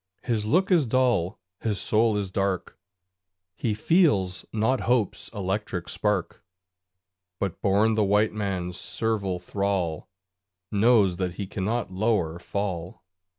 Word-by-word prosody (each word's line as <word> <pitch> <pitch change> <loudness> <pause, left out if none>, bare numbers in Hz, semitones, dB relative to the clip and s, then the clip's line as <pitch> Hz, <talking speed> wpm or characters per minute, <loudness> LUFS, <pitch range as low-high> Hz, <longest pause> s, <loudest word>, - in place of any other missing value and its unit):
His 110 -4 -1
look 185 - +2
is 165 -8 +4
dull, 115 -6 +1 0.2
his 105 -3 -1
soul 110 0 +2
is 100 -2 -3
dark; 95 -2 -1 0.8
He 110 +1 -1
feels 105 - +2
not 115 +4 +1
hope's 120 -6 +1
electric 95 -3 -3
spark; 105 -4 -1 1.0
But, 100 -4 -3
born 105 +3 +3
the 110 -1 +2
white 105 +2 +2
man's 95 -4 -3
servile 105 -5 -1
thrall, 95 -4 -2 0.6
Knows 105 -4 +4
that 90 -2 -2
he 100 - -4
cannot 100 +2 -2
lower 95 -5 0
fall. 90 -3 -4
100 Hz, 120 wpm, -26 LUFS, 95-110 Hz, 1.0 s, is